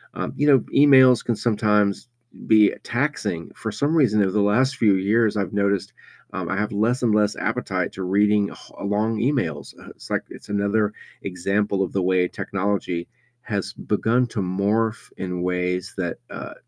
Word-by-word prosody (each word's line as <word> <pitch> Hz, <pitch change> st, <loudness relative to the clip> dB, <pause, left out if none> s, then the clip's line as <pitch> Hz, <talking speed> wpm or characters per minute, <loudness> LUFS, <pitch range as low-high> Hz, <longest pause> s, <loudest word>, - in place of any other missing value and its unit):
Um, -, -, -4 dB
you 145 Hz, -, +1 dB
know, 135 Hz, -3 st, +6 dB, 0.2 s
emails 130 Hz, -3 st, +6 dB
can 120 Hz, -, -1 dB
sometimes 105 Hz, -1 st, +1 dB, 0.4 s
be 110 Hz, -2 st, +5 dB
taxing. 115 Hz, -, -2 dB
For 110 Hz, -1 st, -5 dB
some 150 Hz, +8 st, 0 dB
reason, 110 Hz, -9 st, +3 dB
it -, -, +4 dB
was 95 Hz, -, -2 dB
the 105 Hz, -, +2 dB
last 125 Hz, +7 st, +2 dB
few 105 Hz, -6 st, +3 dB
years 105 Hz, +3 st, +1 dB
I've 100 Hz, -1 st, -2 dB
noticed, 100 Hz, -1 st, 0 dB, 0.4 s
um, 90 Hz, -3 st, -4 dB
I 95 Hz, -, -1 dB
have 105 Hz, 0 st, -1 dB
less 120 Hz, +5 st, 0 dB
and 110 Hz, -3 st, +3 dB
less 105 Hz, 0 st, +1 dB
appetite -, -, -2 dB
to 95 Hz, -, -6 dB
reading 100 Hz, +2 st, +2 dB
h -, -, -14 dB
long 105 Hz, +2 st, 0 dB
emails, 105 Hz, -, -1 dB
uh, -, -, -13 dB
it's -, -, -14 dB
like -, -, -1 dB
it's -, -, -13 dB
another 100 Hz, +1 st, +1 dB, 0.3 s
example 100 Hz, +2 st, -1 dB
of 90 Hz, -, -5 dB
the 95 Hz, -, 0 dB
way 90 Hz, 0 st, +2 dB
technology 95 Hz, -4 st, -3 dB, 0.3 s
has 100 Hz, -4 st, -3 dB
begun 115 Hz, +4 st, 0 dB
to 115 Hz, -3 st, -4 dB
morph 105 Hz, +4 st, -1 dB
in 90 Hz, -1 st, -4 dB
ways 90 Hz, +1 st, -2 dB
that, 85 Hz, -3 st, -3 dB
uh, -, -, -7 dB
105 Hz, 175 wpm, -23 LUFS, 95-115 Hz, 0.4 s, know